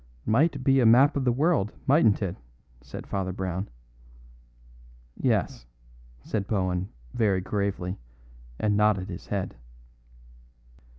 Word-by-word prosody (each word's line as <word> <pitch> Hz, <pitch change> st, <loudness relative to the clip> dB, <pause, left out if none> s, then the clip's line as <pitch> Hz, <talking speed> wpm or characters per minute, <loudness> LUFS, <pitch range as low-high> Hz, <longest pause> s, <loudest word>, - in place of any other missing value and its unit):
"Might 140 Hz, +5 st, +2 dB
be 135 Hz, 0 st, +4 dB
the 125 Hz, -, +4 dB
map 130 Hz, +6 st, +6 dB
of 135 Hz, -2 st, -1 dB
the 125 Hz, -, +4 dB
world, 140 Hz, -, +1 dB
mightn't 130 Hz, -8 st, +4 dB
it?" 90 Hz, -2 st, -2 dB, 0.5 s
said 65 Hz, -, -9 dB
Father 95 Hz, -2 st, -2 dB
Brown. 95 Hz, +1 st, -4 dB, 1.5 s
"Yes," -, -, -1 dB, 0.6 s
said 100 Hz, -3 st, -3 dB
Bohun 95 Hz, -2 st, -1 dB, 0.2 s
very 100 Hz, -4 st, +2 dB
gravely, 95 Hz, -, -2 dB, 0.6 s
and 105 Hz, -1 st, +1 dB
nodded 105 Hz, -3 st, +2 dB
his 90 Hz, 0 st, -8 dB
head. 100 Hz, -3 st, -3 dB
100 Hz, 115 wpm, -26 LUFS, 95-125 Hz, 1.5 s, map